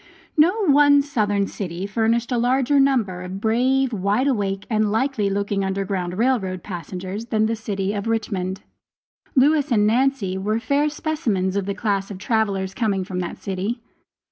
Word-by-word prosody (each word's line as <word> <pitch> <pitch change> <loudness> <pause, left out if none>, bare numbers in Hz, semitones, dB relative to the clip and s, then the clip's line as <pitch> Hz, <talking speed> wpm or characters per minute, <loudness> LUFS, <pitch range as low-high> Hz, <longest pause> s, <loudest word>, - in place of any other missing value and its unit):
No 365 +8 +3
one 285 -2 +5
Southern 205 -8 0
city 185 -2 -5
furnished 225 +3 0
a 245 - +1
larger 260 +3 +2
number 235 -10 +2
of 185 +1 -6
brave, 250 +4 +1
wide 205 +5 +1
awake 200 -7 -1
and 215 -2 +1
likely 225 -2 0
looking 200 0 -1
Underground 190 -2 -2
Rail 250 +2 +3
Road 185 -3 -5
passengers 185 +3 -6
than 220 -2 +1
the 225 +1 0
city 200 -2 -3
of 205 +1 -3
Richmond. 195 -4 -2 0.7
Lewis 290 +1 +3
and 210 -3 +4
Nancy 225 -5 +1
were 215 +3 0
fair 285 +5 +1
specimens 240 - -1
of 200 -1 -1
the 200 - -2
class 200 -3 -1
of 200 - -6
travelers 195 -2 -1
coming 200 -5 0
from 185 0 -5
that 175 -1 -4
city. 195 +5 -3
215 Hz, 165 wpm, -22 LUFS, 195-255 Hz, 0.7 s, one